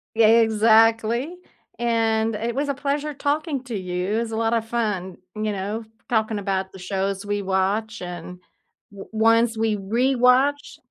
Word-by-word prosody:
Yeah, 225 -1 +5
exactly, 225 +5 +4 0.4
and 225 -2 +1
it 230 +2 -3
was 285 +1 -1
a - - +1
pleasure 285 +2 -2
talking 290 0 -1
to 235 -4 -4
you. 185 +3 -2
It's 225 -1 -4
a 220 - -3
lot 225 0 +1
of 225 -1 0
fun, 210 -6 -2 0.2
you 215 0 -2
know, 205 +3 -4 0.2
talking 220 -2 0
about 190 -1 -2
the 190 - -12
shows 195 +1 -3
we 205 0 -1
watch 195 +4 -1
and 180 0 -7 0.6
o 195 - -10
ones 225 +1 +3
we 220 -1 +1
rewatch 250 +6 +2
225 Hz, 155 wpm, -23 LUFS, 200-235 Hz, 0.6 s, Yeah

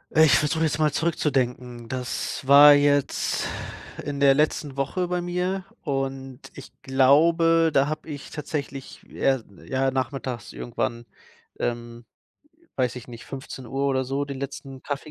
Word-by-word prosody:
Äh, 155 - +7
ich 150 - +5
versuche 155 +2 0
jetzt 155 -1 0
mal 155 -1 +3
zurückzudenken. 125 -7 -1
Das 125 +1 -4
war 145 +1 +10
jetzt 145 -1 +1 0.6
in 145 0 -4
der 140 -1 +6
letzten 150 -1 0
Woche 145 +7 -1
bei 180 0 -1
mir 180 +2 -2 0.2
und 135 -2 -3 0.2
ich 140 - -11
glaube, 165 +5 +4
da 140 0 +3
habe 155 +1 -5
ich 145 -1 -8
tatsächlich, 140 -3 -6
ja, 135 -2 0 0.2
ja, 135 0 0
nachmittags 130 -3 -4
irgendwann, 120 -1 -4 0.5
ähm, 120 0 -4 0.7
weiß 125 -1 0
ich 125 - -9
nicht, 120 -1 -10
15:00 135 0 -5
oder 130 -1 +1
so 135 +2 -2
den 140 -1 -6
letzten 135 -1 -7
Kaffee 145 +1 -5
140 Hz, 145 wpm, -25 LUFS, 130-150 Hz, 0.7 s, war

